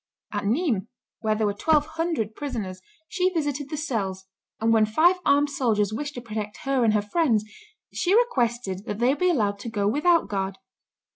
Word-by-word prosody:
At 205 -1 -2
Nismes, 230 - 0 0.3
where 215 -2 0
there 215 0 0
were 205 - +1
twelve 300 +7 +2
hundred 315 -9 -2
prisoners, 220 -10 -5 0.3
she 370 0 +1
visited 290 -5 -2
the 305 - -4
cells, 200 - -3 0.3
and 225 +1 +2
when 220 -1 +5
five 330 +12 +4
armed 285 +1 +4
soldiers 215 -6 +1
wished 290 +5 -4
to 245 - -5
protect 215 +3 -6
her 270 -2 +2
and 220 -2 +3
her 210 - +2
friends, 225 -3 +1 0.5
she 370 +3 +2
requested 240 - 0
that 205 - -4
they 245 +4 +3
be 365 +5 +1
allowed 205 - +1
to 230 - -6
go 205 -3 0
without 330 +9 +3
guard. 195 -1 -3
235 Hz, 185 wpm, -25 LUFS, 210-295 Hz, 0.5 s, when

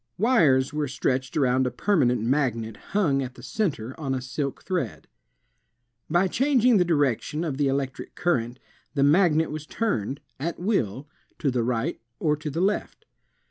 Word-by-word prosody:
Wires 155 - +3
were 150 -1 -1
stretched 130 -1 -1
around 130 -2 +3
a - - +1
permanent 125 - +1
magnet 115 -4 0
hung 155 -10 0
at 130 -1 -5
the 120 - -13
center 130 - -2
on 135 -4 -1
a - - -1
silk 140 +2 -4
thread. 175 - -3 1.0
By 175 +4 +3
changing 250 +1 +3
the 180 - +5
direction 150 -1 0
of 150 -6 -3
the 145 -1 +2
electric 135 -1 -3
current, 125 -8 0 0.4
the 140 - +3
magnet 160 +1 +4
was 155 0 -6
turned, 140 - -1 0.2
at 165 +5 -3
will, 145 - -1 0.3
to 140 - 0
the 125 -1 0
right 125 +6 -1 0.2
or 150 -2 +1
to 150 +1 -5
the 165 +4 -2
left. 200 +3 -1
145 Hz, 160 wpm, -25 LUFS, 130-175 Hz, 1.0 s, the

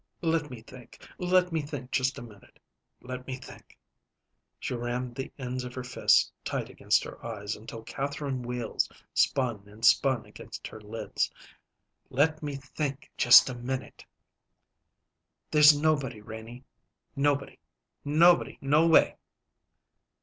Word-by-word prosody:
"Let 160 -2 +1
me 120 -3 -9
think. 130 -1 -14
Let 180 0 +2
me 160 -1 0
think 145 -3 -7
just 130 -1 +1
a - - -7
minute. 105 -4 -16 0.4
Let 125 0 -7
me 130 - -3
think." 130 - -14 0.8
She - - -4
rammed 120 +1 -3
the 135 +2 -6
ends 125 -2 -4
of 125 0 -8
her 130 - -4
fists 125 - +3
tight - - -3
against - - +1
her - - -10
eyes 105 -3 -4
until 110 +1 -9
Catherine 140 0 -4
wheels 120 -1 -2 0.2
spun 120 -7 +1
and 105 +3 -5
spun 130 -1 +4
against - - -10
her 110 - -11
lids. 105 +1 -3 0.8
"Let 155 +4 +1
me 145 -2 -4
think 140 +1 -5
just 120 - +8
a 130 - -3
minute." 125 +2 -5 1.5
"There's 150 -1 +7
nobody, 145 -7 0
Renie 110 +3 -10 0.5
nobody 140 0 0 0.4
nobody 170 +4 +4
no 150 +4 +3
way." 165 - +5
130 Hz, 135 wpm, -28 LUFS, 120-145 Hz, 1.5 s, just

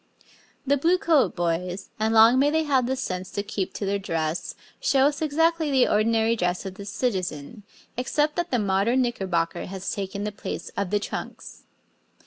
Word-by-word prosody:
The 285 +1 +3
Bluecoat 335 -1 +2
Boys, 175 +2 -2
and 220 +1 +1
long 225 +3 +6
may 285 +2 +4
they 320 +1 +1
have 265 -5 +2
the 265 - 0
sense 185 -8 -4
to 200 - -2
keep 200 -2 -3
to 205 - -3
their 200 +1 0
dress, 165 -3 -3 0.2
show 270 - +2
us 290 +1 0
exactly 320 +1 +1
the 265 -3 +4
ordinary 225 +2 +2
dress 180 -2 -1
of 190 - -5
the 200 +1 -9
citizen, 195 - -3 0.3
except 295 +5 0
that 345 0 -1
the 250 - +1
modern 210 +5 +2
knickerbocker 185 -9 -2
has 190 0 -4
taken 200 0 -4
the 210 - -2
place 200 - -6
of 200 -2 -2
the 205 - +1
trunks. - - -7
215 Hz, 175 wpm, -25 LUFS, 190-270 Hz, 0.3 s, long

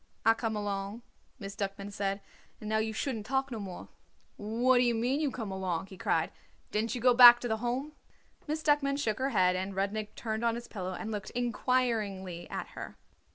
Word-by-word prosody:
"I 225 - +7
come 225 -1 -2
along," 205 +2 -3 0.3
Miss 200 -4 -7
Duckman 200 0 -4
said; 195 0 -2 0.4
"and 215 - -8
now 220 0 +1
you 220 0 -1
shouldn't 220 -1 -3
talk 270 +1 0
no 230 - -4
more." 190 -3 -7 0.5
"What 240 +4 +2
d'ye 245 -1 +3
mean, 245 +5 0
you 305 -2 +1
come 225 -6 -5
along?" 185 -3 -2
he 190 - -12
cried. - - 0 0.4
"Didn't 220 +2 0
you 245 - -4
go 250 0 +6
back 240 0 +10
to 245 - -2
the 220 -1 0
Home?" 245 +6 -2 0.6
Miss 310 +1 -2
Duckman 285 -2 +2
shook 220 -6 -1
her 265 +1 +1
head, 185 -6 +3
and 190 +1 -3
Rudnik 205 +2 -2
turned 220 0 -3
on 230 -1 +2
his 235 0 -7
pillow 185 -3 -5
and 220 +4 -5
looked 210 -1 -4
inquiringly 225 -7 -1
at - - -5
her. - - -8
220 Hz, 200 wpm, -31 LUFS, 200-245 Hz, 0.6 s, back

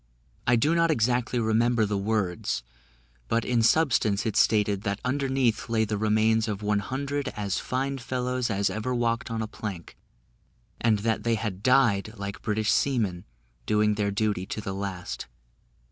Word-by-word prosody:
I 120 - +5
do 145 +8 +2
not 170 0 +3
exactly 125 -3 +1
remember 115 0 +2
the 105 0 -2
words, 100 - -1 0.6
but 115 - 0
in 120 -2 +2
substance 115 -5 +3
it 110 -3 -1
stated, 105 -2 +3
that 100 -1 -2
underneath 130 -3 0
lay 110 -1 +2
the 105 0 -2
remains 110 +1 +2
of 105 -1 -4
one 105 0 +1
hundred 140 +5 -3
as 100 -1 -1
fine 135 +1 -2
fellows 125 0 -2
as 100 -2 0
ever 115 +4 -2
walked 120 +2 0
on 115 -1 -2
a - - -4
plank, 100 -5 -7 0.8
and 110 -2 +3
that 110 -1 +1
they 115 -1 +1
had 105 -4 -4
died, 115 -4 +3
like 100 0 -6
British 110 0 0
seamen, 105 -10 0 0.4
doing 105 0 +3
their 105 -1 0
duty 100 -2 -1
to - - -4
the 95 -2 -4
last. 95 -8 -5
110 Hz, 160 wpm, -27 LUFS, 105-125 Hz, 0.8 s, I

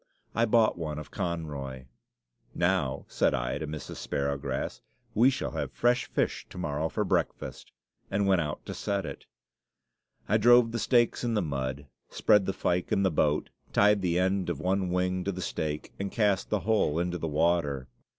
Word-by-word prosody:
I 115 - +3
bought 110 -4 +3
one 75 -2 -3
of 75 -4 -8
Conroy. 70 -6 -4 0.7
"Now," 85 -7 +1
said - - +1
I 65 +2 -2
to 80 - -4
Mrs. 75 0 -6
Sparrowgrass, 70 0 -2 0.3
"we 120 +5 +5
shall 135 - -2
have - - -3
fresh 120 +1 +2
fish - - -1
to - - -11
morrow 80 -2 -1
for - - -1
breakfast," - - -2 0.4
and 100 +1 +1
went 95 -3 +4
out 75 -2 -4
to - - -5
set 100 -1 -2
it. - - -8 1.0
I 110 - +3
drove 120 +1 +6
the 115 - -2
stakes 120 -1 +2
in 120 -2 0
the 105 - +2
mud, 70 -2 -3 0.2
spread 105 -2 +3
the - - +2
fyke 90 -1 -1
in 100 - +2
the 95 - +3
boat, 75 -1 +1 0.2
tied 105 0 +4
the 90 -2 +1
end 95 0 +1
of 85 - -2
one 95 0 0
wing 90 +1 0
to 100 - -1
the 95 - -6
stake, 75 -4 -3
and 100 0 -3
cast 105 -4 +1
the 105 -2 0
whole 100 -6 +2
into 90 +1 -1
the 80 - -2
water. 75 -4 +1
90 Hz, 180 wpm, -29 LUFS, 75-100 Hz, 1.0 s, drove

